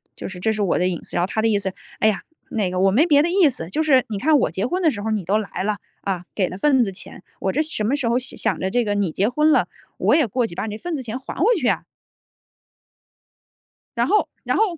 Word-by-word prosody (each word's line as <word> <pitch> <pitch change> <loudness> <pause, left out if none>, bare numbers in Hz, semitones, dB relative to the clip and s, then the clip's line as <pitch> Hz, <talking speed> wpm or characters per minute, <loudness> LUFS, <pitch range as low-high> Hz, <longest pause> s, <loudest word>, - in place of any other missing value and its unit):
就 - - -6
是 185 -2 -9
这 220 +4 +1
是 215 - -3
我 195 - +1
的 180 - +2
隐 175 -2 -3
私。” - - -5
然 175 - +2
后 - - 0
他 220 - -1
的 225 - +2
意 205 - +2
思：” 190 -1 -3 0.3
哎 - - +4
呀， 215 - +1 0.3
那 205 -7 0
个 185 - -2
我 195 +1 +4
没 265 - +4
别 290 -4 +5
的 340 - +1
意 360 -4 +5
思， 165 -10 -6
就 310 +12 0
是 265 -5 +4
你 210 - -3
看 305 +5 +4
我 155 - +1
结 190 +6 -2
婚 365 +7 -1
的 320 - +5
时 205 - -6
候 220 - -2
你 210 -5 -1
都 200 +5 +2
来 200 -3 -4
了， 210 +1 -1 0.2
啊， 185 -3 -3
给 185 -4 +1
了 185 - -7
份 265 +3 +3
子 200 - -2
钱。 190 - -11 0.2
我 190 - 0
这 295 - +1
什 310 -8 -3
么 235 +7 +1
时 260 - -1
候 235 +1 +2
想 220 -6 -2
着 190 - -1
这 245 -2 +1
个 205 - 0
你 200 -5 0
结 195 +5 +1
婚 300 +6 +3
了， - - +3 0.3
我 - - +3
也 315 - +4
过 235 +2 0
去 170 - -10
把 205 - -3
你 210 - -4
那 - - -6
份 350 +4 -3
子 270 - -4
钱 235 +2 -5
还 265 - -8
回 460 +5 +5
去 305 - 0
啊。“ - - +1 2.1
然 - - +2
后 425 - +3 0.2
然 - - 0
后 - - +5
220 Hz, 310 characters per minute, -22 LUFS, 195-285 Hz, 2.1 s, 别